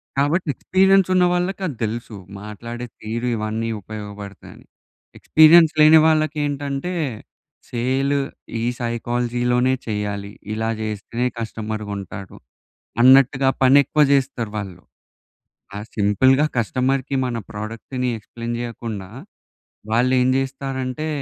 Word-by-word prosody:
కాబట్టి 145 +6 +1
ఎక్స్పీరియన్స్ 190 0 +3
ఉన్న 185 -1 +4
వాళ్ళకి 180 +2 -1
అది 145 - -5
తెలుసు. 110 0 -4 0.3
మాట్లాడే 115 +3 -7 0.2
తీరు 115 +3 -3
ఇవన్నీ 110 +1 -3
ఉపయోగపడతాయని. 105 -1 -10 0.5
ఎక్స్పీరియన్స్ 160 +1 +6
లేని 155 +1 +8
వాళ్ళకి 155 -1 +2
ఏంటంటే, 145 +4 -3 0.8
సేల్ 130 +4 0 0.4
ఈ - - -2 0.2
సైకాలజీ‌లోనే 120 +2 0
చెయ్యాలి. 105 -1 -3 0.2
ఇలా 110 +1 -2
చేస్తేనే 110 +3 -3
కస్టమర్‌గుంటాడు. 105 -3 -6 0.7
అన్నట్టుగా 135 +1 +6
పని 130 +2 +6
ఎక్కువ 150 +2 +2
చేస్తారు 130 -5 0
వాళ్ళు. 95 -4 -6 0.9
ఆ - - -4 0.2
సింపుల్‌గా 130 +8 +3
కస్టమర్‌కి 130 +4 0
మన 120 -2 -2
ప్రొడక్ట్‌ని 115 +4 -4
ఎక్స్‌ప్లేన్ 115 +2 -6
చేయకుండా, 115 -5 -6 0.8
వాళ్ళు 125 +3 +2
ఏం 125 - +2
చేస్తారంటే 135 +1 -3
120 Hz, 100 wpm, -21 LUFS, 110-135 Hz, 0.9 s, లేని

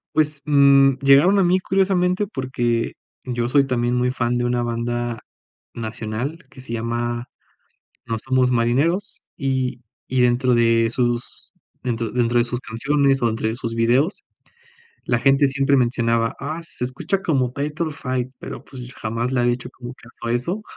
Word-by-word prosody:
Pues, 150 -2 +1
mm, 140 -2 +5
llegaron 140 +9 +5
a - - +4
mí 180 +2 +3
curiosamente, 185 0 +1
porque 120 - -2 0.3
yo 120 -1 -2
soy 140 0 +3
también 120 -1 0
muy 125 0 +1
fan 120 -1 -1
de 120 - 0
una 120 0 0
banda 120 0 -2 0.5
nacional 115 +6 -4
que 130 - -12
se 120 - -7
llama, 120 +1 -2 0.8
No 115 -1 -2
somos 130 +1 +1
marineros, 140 - +1 0.2
y 130 -2 -1 0.3
y 130 - 0
dentro 125 +1 +3
de 115 -1 +3
sus 120 -1 -2 0.3
dentro 115 -3 -2
dentro 120 -1 +1
de 120 - +4
sus 120 0 -2
canciones, 135 +3 +1
o 120 - +3
dentro 110 0 -1
de 110 - -2
sus 115 -2 -4
videos, 125 - +1 0.8
la 120 -1 +2
gente 135 +3 +4
siempre 135 +1 +2
mencionaba: 115 -2 +1
"Ah, 155 +4 -4
se 145 -6 -3
escucha 150 +10 -2
como 135 -8 +1
Title 150 +3 -2
Fight", 130 -3 -3
pero, - - -8
pues, 125 -1 -5
jamás 115 +3 -3
le 125 - +1
había 120 0 +2
hecho 125 +1 -8
como 125 -1 -9
caso 120 -1 -12
a 115 - 0
eso. 180 - -3
125 Hz, 165 wpm, -21 LUFS, 120-140 Hz, 0.8 s, mm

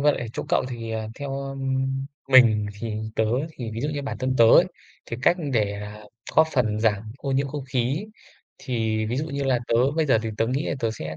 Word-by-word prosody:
vậy 145 0 +4
ở 120 - -4
chỗ - - -3
cậu - - +2
thì, 115 -2 -6
ờ, 110 -1 -3
theo, 135 0 -4
ưm, 135 -1 -2 0.4
mình 115 -6 +6
thì 115 -2 -3 0.2
tớ 110 - +3 0.3
thì 120 -6 -6
ví 110 +1 -5
dụ 145 - -1
như 145 -1 -3
bản 140 - -4
thân 130 0 0
tớ 115 - +8
ấy, 115 - +7 0.4
thì 115 - -4
cách 175 - +5 0.2
để, 105 -4 +1
à, 105 +1 -7 0.4
góp 160 - +7
phần 110 -5 +1
giảm 105 -3 +2 0.2
ô 135 - -4
nhiễm 135 +1 +1
không 145 -1 -5
khí 135 - -1 0.5
thì 110 -3 -1
ví 120 - -2
dụ 150 - -1
như 140 -2 -3
là 130 -2 +2
tớ 115 - +2 0.2
bây 160 -2 +2
giờ 120 -5 +4
thì 115 - -3
tớ 115 - +1
nghĩ 135 +6 -1
là - - -1
tớ 115 - +1
sẽ 80 -7 -6
125 Hz, 235 wpm, -24 LUFS, 110-135 Hz, 0.5 s, tớ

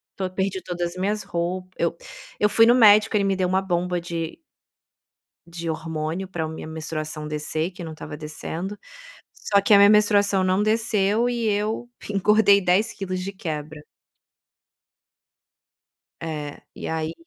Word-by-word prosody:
tô, 190 -1 -3
perdi 190 0 -2
todas 175 -1 -3
as 180 - -12
minhas 205 +3 -1
rou 180 +2 -3
eu 170 0 -1 0.4
eu 210 - +4
fui 225 +2 +5
no 240 - +6
médico, 215 -2 +6
ele 200 - +1
me 195 -1 +1
deu 185 -1 0
uma 190 +1 +2
bomba 180 -1 -1
de 170 -1 -5 1.1
de 170 0 -6
hormônio 160 +3 -3
para 165 -4 -3
a - - -4
minha 160 0 -7
menstruação 155 -1 -4
descer, 155 +3 -2
que 180 -1 -9
não 160 - -6
estava 150 - -8
descendo, 165 +6 -6 0.6
só 200 -1 +1
que 205 - +3
a - - +9
minha 200 0 +7
menstruação 205 -2 +4
não 185 +2 +2
desceu 215 +1 +1
e 235 -2 -2
eu 215 +4 -1 0.2
engordei 200 0 +4
10 185 +4 +2
quilos 185 -2 -4
de 195 +2 -4
quebra. 155 -4 -6 2.4
É, 150 -3 -5
e - - -6
aí 160 0 -2
185 Hz, 155 wpm, -23 LUFS, 160-205 Hz, 2.4 s, a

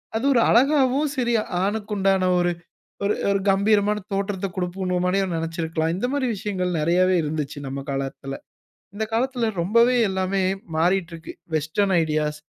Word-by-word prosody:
அது 230 - -1
ஒரு 240 - +4
அழகாவும், 275 +2 +3
சரி 240 -2 0 0.3
ஆணுக்கு 210 +1 -2
உண்டான 190 -1 +2
ஒரு 175 0 +2 0.5
ஒரு 205 - +2 0.2
ஒரு 200 -1 +1
கம்பீரமான 205 +1 +3
தோற்றத்த 195 0 -2
குடுப்புநோமனே 180 0 -1 0.2
நெனச்சிருக்கலாம். 165 0 -2
இந்த 245 - -1
மாதிரி 280 -3 0
விஷயங்கள் 185 -2 -2
நெறையவே 180 +4 +3
இருந்துச்சு 150 -1 -3
நம்ம 135 +1 -5
காலத்துல. 135 0 -4 0.6
இந்த 220 +2 -2
காலத்துல 245 0 0
ரொம்பவே 230 +7 +4
எல்லாமே 190 0 -1 0.3
மாறிட்டுருக்கு. 170 -1 -1 0.2
Western 160 +6 +1
ideas 150 -1 -1
190 Hz, 130 wpm, -23 LUFS, 165-210 Hz, 0.6 s, ஒரு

